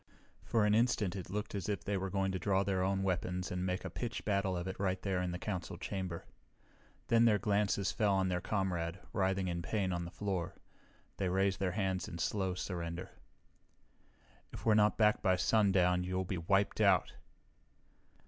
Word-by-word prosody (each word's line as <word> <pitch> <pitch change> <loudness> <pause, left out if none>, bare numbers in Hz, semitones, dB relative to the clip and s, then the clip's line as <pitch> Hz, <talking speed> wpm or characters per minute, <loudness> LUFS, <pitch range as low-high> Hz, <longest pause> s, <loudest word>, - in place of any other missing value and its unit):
For 110 -2 +2
an 105 - +3
instant 110 -4 +2
it 95 -3 -6
looked 105 +2 -3
as 100 -1 -3
if 100 - -2
they 100 - -1
were 95 0 -2
going 95 0 0
to 95 - -2
draw 95 0 +2
their 95 -1 0
own 95 +1 +1
weapons 90 -1 -1
and 90 0 -2
make 90 0 -2
a - - -3
pitched 120 -2 -4
battle 100 -3 +1
of 85 +1 -4
it 95 - -5
right 95 -1 0
there 95 -2 -1
in 90 - -1
the 90 - -3
Council 90 -3 -4
chamber. 90 -2 -4 0.8
Then 115 0 +5
their 110 -3 +5
glances 100 -1 +1
fell 105 -4 +2
on 95 -1 +2
their 90 -1 -1
comrade, 90 -3 -1
writhing 95 -3 +1
in 85 -1 -2
pain 95 0 -1
on 85 0 -2
the - - -6
floor. 95 -1 -3 0.6
They 95 -2 0
raised 95 +1 +1
their 95 -3 0
hands 95 -3 -1
in 85 - -6
slow 95 +1 -1
surrender. 90 -2 -4 1.4
"If - - -9
we're 110 - +5
not 105 0 +4
back 105 -1 +4
by 95 -2 +3
sundown, 90 -2 +3
you'll 95 +1 -2
be 90 -1 -3
wiped 100 +5 +1
out!" 100 -4 +4
95 Hz, 190 wpm, -34 LUFS, 90-100 Hz, 1.4 s, Then